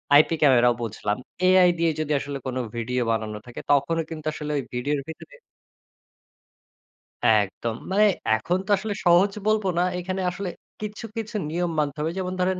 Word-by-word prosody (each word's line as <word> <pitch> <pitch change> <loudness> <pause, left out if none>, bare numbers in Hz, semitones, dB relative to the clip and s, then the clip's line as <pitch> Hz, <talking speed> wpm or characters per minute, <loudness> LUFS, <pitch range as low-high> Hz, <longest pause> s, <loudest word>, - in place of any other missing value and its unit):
IP 155 +3 +6
ক্যামেরাও 120 -4 +5
বুঝলাম। 105 -1 -2 0.3
AI 185 -1 +6
দিয়ে 165 -1 +3
যদি 155 -1 -2
আসলে 140 0 -5
কোন 130 0 -3 0.2
ভিডিও 125 +2 -1
বানানো 110 -1 -2
থাকে 120 - -8
তখনও 160 +4 +2
কিন্তু 155 -2 -7
আসলে 150 -1 -5
ওই 140 - -1
ভিডিওর 140 +4 -1
ভেতরে 320 - -10 1.9
একদম। 110 +1 +2 0.2
মানে 210 +2 +4 0.3
এখন 175 +11 0
তো - - -15
আসলে 210 +2 -3
সহজ 175 +4 +5 0.2
বলবো 215 -2 +2
না। - - +4 0.2
এখানে 185 +1 -3
আসলে 180 +1 -4 0.3
কিছু, 210 +2 -5
কিছু 220 0 -5
নিয়ম 175 +2 -1
মানতে 150 0 -1
হবে। 160 +2 0
যেমন 185 0 -3
ধরেন, 185 0 +1
160 Hz, 160 wpm, -25 LUFS, 125-185 Hz, 1.9 s, IP